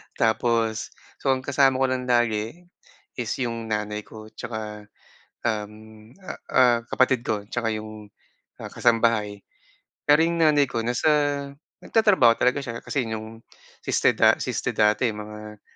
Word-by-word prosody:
Tapos, 115 -1 0 0.2
so - - -5
ang 130 - -7
kasama 135 -1 +3
ko 135 +1 +2
lang 125 -1 -2
lagi 120 +5 0 0.5
is 120 -3 -4
'yong 115 -3 -3
nanay 105 0 -2
ko 110 +1 -12
'tsaka, 110 -2 -8 0.5
um, 105 -2 -2 0.5
ah, 185 - -8 0.2
ah, 125 -2 +5
kapatid 130 0 +2
ko 105 -2 -1
'tsaka 120 -2 -1
'yong 110 -1 -8 0.5
ah, - - -8
kasambahay. 115 -4 +1 0.7
Pero 150 +3 +6
'yung 170 0 -1
nanay 150 -3 +4
ko 120 -3 -3
nasa 120 +6 0 0.8
nagtatrabaho 205 - +4
talaga 125 +2 +3
siya 115 -2 -6
kasi 135 -4 -2
'yong, 110 +1 -7 0.4
siste - - +2
da - - +6
siste - - -2
dati, 110 +2 +2
mga 105 0 -9
115 Hz, 135 wpm, -24 LUFS, 110-125 Hz, 0.8 s, Pero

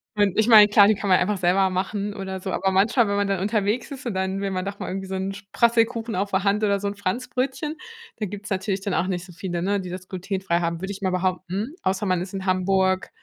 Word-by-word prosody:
Und 205 -3 +2
ich 220 0 +3
meine, 215 -3 +9
klar, 205 -1 +6
die 215 - +4
kann 200 0 -4
man 185 - +6
einfach 205 +3 0
selber 185 +1 +3
machen 200 +2 -2
oder 190 -1 -5
so. 190 0 -5
Aber 190 - 0
manchmal, 210 +5 +3
wenn 200 - 0
man 200 0 +1
dann 195 -2 0
unterwegs 210 +6 -1
ist, 265 -2 -8
und 220 - -3
dann 190 +1 -1
will 200 - -1
man 185 0 -2
doch 200 0 -5
mal - - -5
irgendwie 190 +1 -4
so 190 - -4
'n 190 +1 -2
Sp 195 - -11
Prasselkuchen 230 -1 +2
auf 200 +2 -1
der 190 0 +1
Hand 205 +1 +1
oder 200 -1 +2
so 200 - -3
'n 200 - -3
Franzbrötchen, 255 - -2 0.4
da 215 - -2
gibt's 205 +1 -7
natürlich 195 0 -1
dann 195 -1 -2
auch 180 - +1
nicht 180 -2 -3
so 180 - -13
viele, 175 0 -4
ne, 200 +3 0
die 185 -1 -6
das 185 0 -7
glutenfrei 185 -1 -2
haben, 170 -1 -2
würde 190 +1 -4
ich 200 +1 -8
mal 190 -1 0
behaupten. 185 - -2
Außer 190 +2 0
man 185 -2 +1
ist 185 +2 -7
in 190 -1 -4
Hamburg- 190 0 +1
195 Hz, 270 wpm, -24 LUFS, 185-205 Hz, 0.4 s, meine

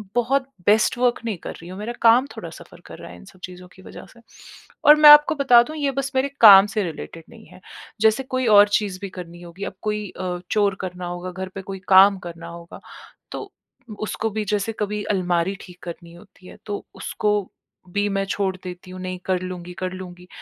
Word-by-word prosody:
बहुत 260 +3 +1 0.2
best 215 +3 +3
work 245 0 +1
नहीं 215 -5 -3
कर - - -8
रही 170 - -13
हूँ, 185 - -9
मेरा 230 +3 -5
काम 235 +4 +5
थोड़ा - - -7
सफ़र - - -14
कर - - -11
रहा - - -10
है - - -12
इन - - -16
सब 190 -1 -18
चीज़ों 180 0 -10
की 190 - -16
वजह - - -12
से 240 - -19 0.7
और 300 - +9
मैं 300 -1 +9
आपको 295 +1 +7
बता 250 -4 +5
दूँ 310 +6 -9
ये 285 -2 -1
बस 275 0 -2
मेरे 265 +2 +1
काम 200 -3 +10
से 205 0 -2
रिलेटेड 165 0 -8
नहीं 225 -2 -16
है। - - -16 0.4
जैसे 220 +4 +3
कोई 255 -1 -2
और 205 -1 +7
चीज़ 200 -3 -1
भी 200 - -5
करनी 175 -2 -10
होगी 175 +3 -10
अब - - -6
कोई 210 -2 -3
अ, 180 -1 -5
चोर 205 -2 +1
करना 180 -1 -6
होगा 175 +1 -6
घर 190 +1 -7
पे 195 - -5
कोई 195 0 -8
काम 195 +1 +7
करना 170 -2 -9
होगा 170 0 -11 0.5
तो - - -7 0.5
उसको 220 +1 -3
भी 215 0 -3
जैसे 210 +2 -2
कभी 210 0 -3
अलमारी 180 0 0
ठीक 180 -1 -14
करनी 170 -1 -9
होती 185 +1 -18
है - - -13
तो 205 - -5
उसको 210 -1 -2 0.6
भी 205 +2 -1
मैं 195 - -1
छोड़ 190 -2 -1
देती 180 0 -9
हूँ 185 0 -9
नहीं 185 0 -5
कर 185 -1 0
लूँगी, 180 -1 -7
कर 185 0 -5
लूँगी। 180 -1 -10
195 Hz, 220 wpm, -22 LUFS, 180-220 Hz, 0.7 s, काम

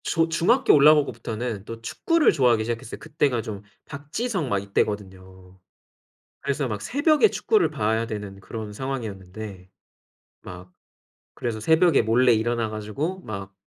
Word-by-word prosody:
저 165 -1 +1
중학교 175 +10 +3
올라오고부터는 125 -7 +2
또 115 0 -8
축구를 330 - +2
좋아하기 125 -8 +3
시작했어요. 115 +1 -5
그때가 145 -5 0
좀 105 -3 -7 0.2
박지성 155 - -4
막 100 - +1
이때거든요. 95 -2 -4 0.8
그래서 140 0 -1
막 105 -3 -4
새벽에 305 - +3
축구를 435 -3 +1
봐야 110 +2 0
되는 105 -3 -7
그런 110 +1 -7
상황이었는데 105 -6 -6 0.7
막 90 0 -10 0.6
그래서 115 -2 -3
새벽에 160 +6 +4
몰래 120 +3 +4
일어나 115 0 0
가지고 110 - -4
막 100 - -7
115 Hz, 330 characters per minute, -24 LUFS, 105-145 Hz, 0.8 s, 새벽에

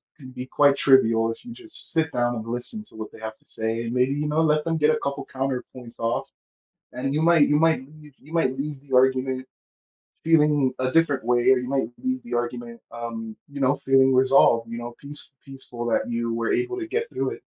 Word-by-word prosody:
can 130 -4 -12
be 125 0 -7
quite 140 +1 +3
trivial 115 -5 +4
if 115 - -10
you 240 - -10
just 335 +6 -11
sit 160 0 +1
down 120 0 0
and 110 -1 -6
listen 120 - -5
to 215 - -21
what 110 -1 -7
they - - -14
have 110 0 -6
to - - -34
say 110 +1 -3
and 115 - -4
maybe, 125 +2 +2
you 145 +1 -2
know, 150 +2 +1
let 150 -1 +2
them 165 0 -1
get 150 0 +3
a - - +3
couple 140 0 -3
of - - -22
counterpoints 130 -2 -5
off 115 0 -1 0.6
and 130 +3 -3
you 155 - +1
might 165 -3 +5
you 150 - +3
might 160 -1 +3
y 150 0 -15
you 150 +4 -16
might 130 -6 +2
leave 145 0 -4
the 140 -1 -16
argument 130 0 +2 0.8
feeling 150 -4 +3
a 130 - 0
different 150 -6 +2
way, 120 0 +3
or 130 - +5
you 125 - -5
might 135 -4 0
leave 260 0 -1
the 240 - -8
argument, 120 -1 -4
um, 115 -2 -6 0.2
you 140 - -7
know, 135 +1 +3
feeling 135 0 +4
resolved, 130 -3 +4
you 115 - -4
know, 120 0 -7
peace 145 +1 -11
peaceful 130 -3 -8
that 120 0 0
you 115 0 -2
were 115 0 -1
able 370 0 -1
to 335 - -5
get 460 +5 -2
through - - -2
it. - - -9
130 Hz, 230 wpm, -24 LUFS, 120-150 Hz, 0.8 s, might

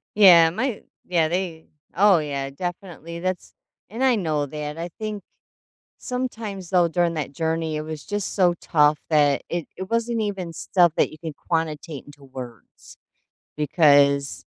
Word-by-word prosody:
Yeah, 175 -6 +8
my 225 +5 -2 0.2
Yeah, 170 -3 +2
they 170 -2 -3 0.3
Oh, 195 0 +5
yeah, 140 -2 -3
definitely, 170 +1 -6
that's 185 +1 -4 0.4
And 225 +6 -6
I 255 -3 +4
know 155 -7 -1
that 150 +1 -6
I 170 +1 -4
think 215 -2 -4 0.8
sometimes, 225 -7 -5
though, 180 -2 +4
during 170 0 0
that 150 -2 -3
journey, 160 0 -1
it 150 - -2
was 155 -1 -7
just 205 -1 -3
so 180 -3 +3
tough 150 -1 +3
that 145 -3 +3
it 170 -2 -3
it 190 +1 -7
wasn't 230 0 0
even 190 -5 -3
stuff 175 -1 +2
that - - +2
you 155 - -12
could 160 -3 -6
quantitate 160 -3 -3
into 145 -1 -16
words 130 -4 -11 0.6
because 140 -2 +3
165 Hz, 150 wpm, -23 LUFS, 150-190 Hz, 0.8 s, Yeah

